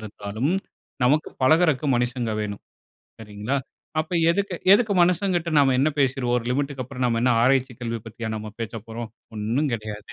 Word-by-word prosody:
இருந்தாலும் 110 - -3 0.5
நமக்கு 150 +5 +3
பழகுறக்கு 155 0 +4
மனுஷங்க 120 -1 -1
வேணும். 100 -1 -5 0.6
சரிங்களா? 105 +5 -3 0.4
அப்ப 155 +3 -6 0.2
எதுக்கு, 195 +1 -1 0.2
எதுக்கு 210 0 +4
மனுஷங்கிட்ட 175 -1 +1
நாம 135 -2 +5
என்ன 140 +4 +4
பேசிருவோம்? 130 -2 +1
ஒரு 115 - -7
லிமிட்க்கு 135 0 -1
அப்புறம் 130 0 -4
நாம் 115 -1 +1
என்ன 125 +1 +3
ஆராய்ச்சிக் 130 -2 +2
கல்வி 115 -1 -3
பத்தியா 115 0 -6
நாம் 110 0 -7
பேசப்போறோம். 115 +1 -6 0.3
ஒண்ணும் 115 +8 0
கிடையாது. 105 0 -7
125 Hz, 150 wpm, -24 LUFS, 110-145 Hz, 0.6 s, நாம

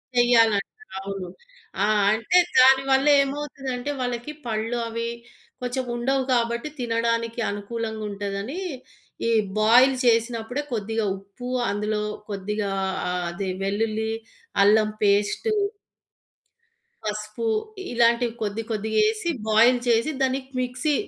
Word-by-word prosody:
చెయ్యాలంట 235 - +3 0.2
అవును. 195 -1 -5 0.6
ఆ! - - +4 0.3
అంటే 225 +10 +2 0.2
దానివల్ల 265 +1 +5 0.2
ఏమవుతదంటే 275 -2 -4
వాళ్ళకి 245 +3 -3 0.2
పళ్ళు 225 +2 -1
అవి 230 +1 -3 0.5
కొంచెం 250 +1 -2
ఉండవు 265 +3 0
కాబట్టి 235 +3 0
తినడానికి 230 0 -1
అనుకూలంగా 220 +2 -4
ఉంటదని, 200 - -4 0.7
ఈ - - +2 0.3
బాయిల్ 250 +5 +6
చేసినప్పుడే 230 +2 +1
కొద్దిగా 220 0 -1
ఉప్పు, 200 +5 -10 0.2
అందులో 210 +1 -1 0.3
కొద్దిగా 205 0 -3 0.4
ఆహ్, 180 0 -2
అది 195 +2 -4 0.2
వెల్లుల్లి 220 +2 -1 0.5
అల్లం 215 +1 +5
పేస్టు... 205 - +2 1.5
పసుపు 215 +2 -4 0.5
ఇలాంటివి 235 0 +3
కొద్ది 215 +1 -2
కొద్దిగా 220 0 -1
యెసి 430 -5 -1 0.2
బాయిల్ 230 +4 +5
చేసి, 230 +5 +3
దాని 265 +1 +1 0.2
మిక్సీ 255 +4 -1
230 Hz, 100 wpm, -24 LUFS, 210-250 Hz, 1.5 s, బాయిల్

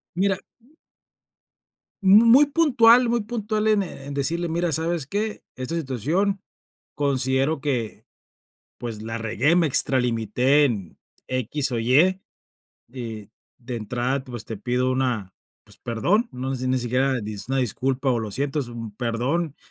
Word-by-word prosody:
Mira 195 +1 +1 1.7
Mu 205 +4 +7
muy 255 +6 +7
puntual, 250 -6 +5
muy 235 -1 +1
puntual 215 -1 -2
en, 215 -2 +3
eh, 140 -7 -7
en 145 - -6
decirle: 165 +5 -1
"Mira, 170 0 -1
¿sabes 160 -1 -1
qué?, 210 +5 -3
esta 130 +4 -5
situación 165 - -1 0.6
considero 135 +1 +1
que, 120 -9 -3 0.7
pues, 115 -3 -6
la 115 +1 -4
regué, 115 +9 +1
me 175 -2 +3
extralimité 125 +1 +3
en 100 - -4 0.3
equis 130 +2 0
o 120 - -1
ye, 155 +11 +3 0.7
y, 115 -5 -7 0.3
de 125 0 -6
entrada, 125 +5 -2
pues, 120 -4 -8
te 110 - -5
pido 125 +4 -1
una 125 -7 -1 0.3
pues, - - -12
perdón, 190 - 0
no 130 +2 -4
sé 130 - -5
si 130 - -1
ni 130 - +1
siquiera 125 +2 0
es 105 +1 -6
una 135 - +1
disculpa 130 +3 -1
o 120 - +1
lo 110 -2 -4
siento, 140 +5 -1
es 125 - -4
un 115 -3 -8
perdón, 130 +7 -2
135 Hz, 150 wpm, -23 LUFS, 120-170 Hz, 1.7 s, Mu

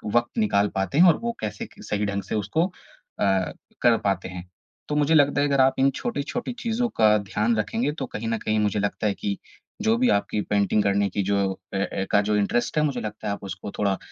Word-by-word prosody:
वक़्त 120 - +1
निकाल 150 - +3
पाते 95 +8 -1
हैं 180 - +8
और - - -5
वो 235 - 0
कैसे 110 - -4
सही 105 0 -2
ढंग 100 -1 -2
से - - -1
उसको 110 - +1
अ, - - -15 1.1
कर 120 -2 +5
पाते 95 -2 0
हैं। 90 0 -8 0.4
तो 150 - -1
मुझे 150 +1 +2
लगता 145 -1 +4
है 145 - +3
अगर 140 -1 +3
आप 130 0 +4
इन 135 +1 +5
छोटी-छोटी 240 - -3
चीज़ों 235 +1 0
का 105 -1 +5
ध्यान 105 +3 0
रखेंगे 225 - 0
तो 135 - -2
कहीं 115 -2 -5
न 115 - 0
कहीं 110 0 +1
मुझे 105 -1 +1
लगता 100 +1 -1
है 100 - +1
कि 100 0 -3 0.5
जो 220 +1 +3
भी 250 +1 +3
आपकी 100 +1 +1
पेंटिंग 100 0 +1
करने 100 0 +2
की 100 - -1
जो 100 +1 +1 0.4
ए - - 0
ए - - 0
एका 100 +1 +2
जो 105 - +3
इंटरेस्ट 120 +8 0
है 150 - +4
मुझे 145 -3 -1
लगता 105 0 -6
है 100 - 0
आप 100 - -8
उसको 95 +1 -6
थोड़ा 100 -2 +1
110 Hz, 230 wpm, -25 LUFS, 100-145 Hz, 1.1 s, हैं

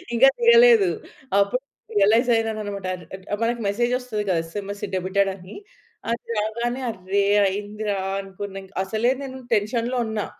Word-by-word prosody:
ఇంకా 265 +4 +7
దిగలేదు 470 -4 +7 0.5
అప్పుడు 200 +6 +1 0.4
రియలైజ్ 220 +5 +4
అయినానన్నమాట 215 -3 -2
ఆర్ 180 - -12 0.3
ఆ‌ట్ 205 - -2
మనకు 235 +1 0
మెసేజ్ 240 +4 0
వస్తది 230 -5 -3
గదా! 175 -3 +2
ఎస్ఎంఎస్ 200 +4 -6
డెబిటెడ్ 195 +2 +1
అని. 185 0 -12 0.6
అది 235 - -4
రాగానే 235 +4 -2
అర్రె! 195 0 -1 0.2
అయిందిరా 205 +1 -3 0.2
అనుకున్నా 195 0 -8
ఇంక్ 190 +1 -17
అసలే 220 +5 +1
నేను 265 -1 -7
టెన్షన్‌‌లో 230 +4 0
ఉన్నా 220 -2 -2
210 Hz, 140 wpm, -23 LUFS, 200-240 Hz, 0.6 s, ఇంకా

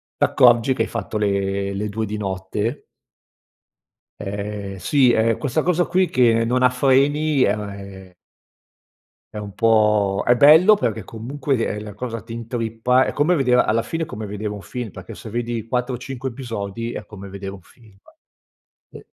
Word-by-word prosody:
t'accorgi 120 +1 +4
che - - 0
hai - - -4
fatto 110 -1 -4
le 100 -1 -1
le 105 +2 -3
2 110 +2 -2
di 105 +1 -5
notte 100 +5 -3 1.4
Ehm, 100 -1 -5
sì. 125 - +3
Ehm, 115 0 +2
questa 145 +2 -1
cosa 175 0 +2
qui 185 +1 +2
che 115 -2 +3
non 125 +2 +1
ha 125 - +6
freni 140 +2 +2
è 100 - +3 1.8
è - - -9
un 105 -1 -6
po' 105 -3 +2
è 120 - +6
bello, 160 - +7
perché 110 - -2
comunque, 135 +5 -3
ehm, 105 0 -4
la 105 -1 -8
cosa 115 +1 -5
ti 115 +1 -10
intrippa. 115 +2 0
È - - -3
come 155 +5 +2
vedere 125 -3 +3
alla 115 +1 +1
fine 165 +7 -3
è - - -12
come 110 +1 -7
vedere 105 +1 -4
un 105 -1 -7
film. 120 +3 -6
Perché - - -10
se - - -10
vedi 115 0 -3
4-5 125 +1 -3
episodi, 115 -2 -5
è 105 - -6
come 100 -2 -10
vedere 95 0 -7
un 95 - -11
film, 110 +3 -21 1.0
e - - -12
115 Hz, 165 wpm, -21 LUFS, 105-130 Hz, 1.8 s, bello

